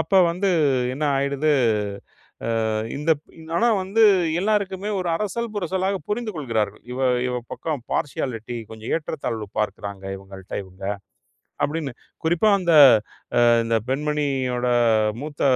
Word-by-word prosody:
அப்ப 160 +4 -2 0.2
வந்து 190 +3 0 0.4
என்ன 150 +3 -2
ஆயிடுது, 140 +2 +1 1.2
ஆ, - - 0 0.3
இந்த 150 +3 +1 0.4
ஆனா 235 +6 +3 0.2
வந்து 200 +4 +1 0.4
எல்லாருக்குமே 200 -1 0
ஒரு 180 - -2
அரசல் 210 +4 -2
புரசலா 190 0 -1 0.2
புரிந்து 220 +1 -2
கொள்கிறார்கள். 115 -8 -2
இவ 130 - -5 0.3
இவ 125 - -2 0.2
பக்கம் 155 -6 -3
பார்சியாலிட்டி 120 -6 -2
கொஞ்சம் 110 0 -7
ஏற்றத்தாழ்வு 140 -9 -4
பார்க்குறாங்க 100 -2 -3
இவங்கள்ட்ட 95 0 -12
இவங்க. 95 +1 -15 0.8
அப்படின்னு 150 -1 -2 0.3
குறிப்பா 175 +6 +3
அந்த 170 -3 +2 0.9
இந்த 115 0 +1
பெண்மணியோட 135 -3 0 0.5
மூத்த 145 -1 -5
150 Hz, 110 wpm, -23 LUFS, 120-185 Hz, 1.2 s, ஆனா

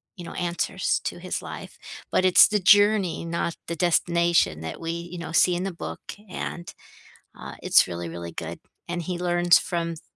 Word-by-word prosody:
you 180 - -9
know, - - -8
answers 175 +2 -1
to - - -3
his 180 +1 -4
life, - - -9 0.4
but - - +2
it's 185 -1 +7
the 210 - 0
journey, 205 -3 +4
not 170 0 -2
the 170 - -3
destination 170 - +2
that 80 0 -6
we, 165 0 -3
you 170 +1 -6
know, 165 -1 -6
see 175 +2 +4
in 175 - -2
the 195 -1 -3
book, 170 - -7 0.3
and, 175 -1 -6 0.6
uh, - - -8
it's - - +5
really, 85 -1 -5
really 85 0 -7
good, 80 +1 -6 0.3
and 175 0 -3
he 180 +1 -3
learns 175 -1 +4
from 170 -2 -3
th 155 - -13
170 Hz, 190 wpm, -25 LUFS, 165-180 Hz, 0.6 s, it's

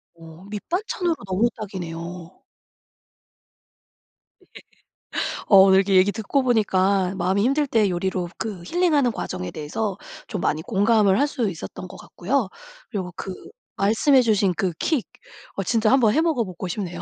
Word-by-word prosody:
어 165 +1 -14
밑반찬으로 345 - -2
너무 195 +5 +1
딱이네요. 175 -3 -7 2.0
네. - - -26 1.0
어 200 - +8
오늘 190 0 +7
이렇게 195 0 +1
얘기 185 +2 +5
듣고 220 +7 -1
보니까 195 -5 +2
마음이 190 +2 +1
힘들 280 +3 +2
때 220 -5 +2
요리로 180 0 -2
그 205 -6 -5
힐링하는 300 - +2
과정에 90 - -5
대해서 185 +7 -3 0.3
좀 200 -5 -4
많이 155 - 0
공감을 205 0 +3
할 285 - +4
수 235 -7 -1
있었던 185 +2 -8
것 - - -12
같고요. 225 +3 -2 0.4
그리고 185 -4 -4
그 190 +1 -6 0.4
말씀해 225 +7 +4
주신 205 -5 +2
그 185 +1 0
킥 300 -9 0 0.5
어 195 - -2
진짜 220 +3 +2
1 270 - +5
번 220 -3 +3
해 315 - +3
먹어보고 230 - -1
싶네요. 180 -1 -5
200 Hz, 295 characters per minute, -23 LUFS, 185-235 Hz, 2.0 s, 어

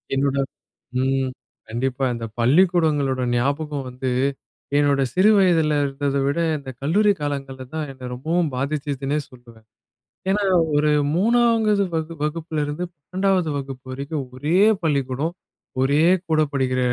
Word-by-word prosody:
என்னோட 140 0 +1 0.6
ம். 135 0 0 0.4
கண்டிப்பா. 130 +3 -1
இந்த 115 -1 -5
பள்ளிக்கூடங்களோட 145 -2 +3
ஞாபகம் 140 +2 -1
வந்து, 130 +1 -4 0.7
என்னோட 140 -1 +3
சிறு 190 +4 +5
வயதுல 165 -6 +3
இருந்தத 140 0 -1
விட 140 +4 0 0.2
இந்த 135 -1 -9
கல்லூரி 205 +8 +3
காலங்கள்ல 135 -2 -4
தான் 155 -2 -2
என்ன 130 -1 -9
ரொம்பவும் 160 +5 0
பாதிச்சுதுன்னே 140 +1 -2
சொல்லுவேன். 120 -3 -17 0.6
ஏன்னா, 205 +1 +2 0.3
ஒரு 150 +1 +3 0.2
3வது 220 0 +3
வகு 160 +1 -2
வகுப்பிலிருந்து 155 0 -2
12வது 185 +2 0
வகுப்பு 135 -2 -7
வரைக்கும் 140 +1 -4
ஒரே 150 +7 0 0.3
பள்ளிக்கூடம், 140 +1 0 0.5
ஒரே 145 +4 +3 0.3
கூட 155 -1 +3
படிக்கிற 130 -1 0
145 Hz, 115 wpm, -22 LUFS, 135-165 Hz, 0.7 s, சிறு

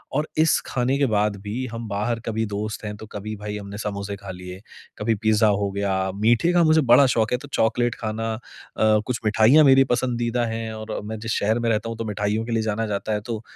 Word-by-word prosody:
और 150 +2 0
इस 160 0 +4
खाने 130 +2 0
के 140 - +2
बाद 105 0 +1
भी 110 +6 -4
हम 115 0 -6
बाहर 105 +3 -2
कभी 110 0 -1
दोस्त 105 +1 -4
हैं 105 0 -4
तो 110 - -9
कभी 110 +1 -5
भाई 105 0 -5
हमने 100 0 -8
समोसे 100 -1 -4
खा 100 -1 -8
लिए, 90 +1 -9 0.4
कभी 110 +1 0
पिज्जा 110 +1 +2
हो 100 -1 +1
गया, 95 -1 -1
मीठे 115 - +2
का 175 -1 +4
मुझे 155 0 +4
बड़ा 130 +2 +6
शौक 110 0 +1
है 125 - +2
तो 145 - -11
चॉकलेट 120 +1 +1
खाना 110 0 -3
अ, 110 - -6 0.7
कुछ 125 -2 -2
मिठाइयाँ 110 +8 +5
मेरी 135 -1 +7
पसंदीदा 120 -1 0
हैं 115 0 -4
और 110 0 -5
मैं 110 0 -5
जिस 115 +1 -4
शहर 110 +3 +1
में 120 0 0
रहता 115 0 0
हूँ 115 - -5
तो 115 - -4
मिठाइयों 105 +1 -1
के 120 - -5
लिए 115 -1 +1
जाना 110 +1 -1
जाता 105 +1 -2
है 105 - -1
तो 115 -3 -4
110 Hz, 230 wpm, -23 LUFS, 105-120 Hz, 0.7 s, मेरी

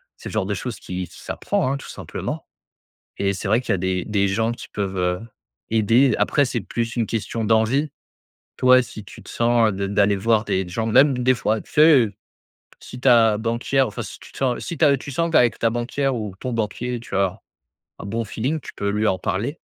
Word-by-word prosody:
c'est - - -9
le - - -9
genre 110 -3 0
de 100 - -2
choses 105 +2 -5
qui 90 0 -5
s'apprend, 130 - -2
hein, 135 - 0
tout 140 - -8
simplement. - - -6 0.7
Et 100 0 0
c'est 100 +1 -4
vrai 110 - +4
qu'il 120 -5 -1
y - - +3
a - - -3
des 90 0 -1
des 100 -2 +1
gens 115 +4 0
qui - - -10
peuvent, 100 -2 -3
heu, 90 0 0 0.5
aider, 115 +4 +3
après 145 - +2
c'est 120 -3 -2
plus 115 +4 -3
une 115 -2 +1
question 115 +1 -3
d'envie. 115 +7 +2 0.7
Toi, 130 0 +6
si 110 -3 -9
tu - - -12
te - - -14
sens 115 -2 +2
d 100 0 -2
d'aller 100 0 +2
voir 110 +2 +2
des 95 -2 0
d - - -10
gens, 110 +4 -2
même 130 +3 +4
des 130 +1 +3
fois, 110 -1 0
tu - - -20
sais, 150 -7 +6 0.7
si 125 - -10
ta 115 -5 +5
banquière, 120 +4 0
enfin, 105 - -6
si - - -8
tu - - -15
te - - -13
sens 130 -3 0
si 170 - -5
tu - - +1
as 140 -2 +5
tu 140 +2 -8
sens 165 +5 -1
qu'avec 120 -7 +4
ta 115 - +2
banquière 125 +4 -1
ou 105 -5 -5
ton 130 - -3
banquier, 115 +2 -2
tu 115 - -8
as 95 -2 0 0.6
un - - -9
bon 115 +3 -2
feeling, 125 +9 -2
tu - - -10
peux 100 - -2
lui 105 +2 0
en 95 - +2
parler. 115 - -2
115 Hz, 225 wpm, -22 LUFS, 100-125 Hz, 0.7 s, Toi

